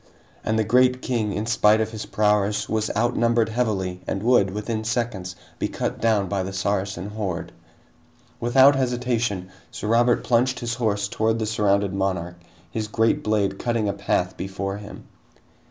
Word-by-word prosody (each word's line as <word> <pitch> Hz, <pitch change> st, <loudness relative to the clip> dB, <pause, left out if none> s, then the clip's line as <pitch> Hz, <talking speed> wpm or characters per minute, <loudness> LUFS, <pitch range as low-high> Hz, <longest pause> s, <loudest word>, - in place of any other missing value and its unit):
And 110 Hz, -, 0 dB
the 110 Hz, -, +3 dB
great 125 Hz, +3 st, +3 dB
king, 115 Hz, -5 st, -1 dB
in 105 Hz, +2 st, -2 dB
spite 110 Hz, -1 st, +4 dB
of 110 Hz, 0 st, -1 dB
his 110 Hz, -1 st, -6 dB
prowess 105 Hz, -1 st, +1 dB
was 110 Hz, 0 st, -1 dB
outnumbered 115 Hz, 0 st, +2 dB
heavily 100 Hz, -6 st, -1 dB
and 100 Hz, -, -2 dB
would, 120 Hz, -5 st, +4 dB
within 110 Hz, +3 st, -3 dB
seconds, 110 Hz, -5 st, -2 dB, 0.2 s
be -, -, 0 dB
cut -, -, -4 dB
down 110 Hz, -3 st, +2 dB
by 95 Hz, +1 st, -1 dB
the 95 Hz, +1 st, -4 dB
Saracen 95 Hz, 0 st, -2 dB
horde! 100 Hz, -5 st, -4 dB, 0.9 s
Without 130 Hz, +4 st, +5 dB
hesitation, 120 Hz, -7 st, -1 dB, 0.2 s
Sir 105 Hz, -, -6 dB
Robert 120 Hz, +1 st, +3 dB
plunged 125 Hz, +1 st, +2 dB
his 120 Hz, -1 st, -2 dB
horse 105 Hz, -4 st, 0 dB
toward 110 Hz, +2 st, 0 dB
the 110 Hz, -, -1 dB
surrounded 100 Hz, -2 st, +1 dB
monarch, 90 Hz, -3 st, -2 dB, 0.3 s
his 110 Hz, -1 st, -3 dB
great 110 Hz, +1 st, +1 dB
blade 105 Hz, -2 st, 0 dB
cutting 115 Hz, -3 st, 0 dB
a 100 Hz, -, 0 dB
path -, -, -1 dB
before 95 Hz, +1 st, -4 dB
him. 105 Hz, 0 st, -10 dB
110 Hz, 160 wpm, -23 LUFS, 100-115 Hz, 0.9 s, Without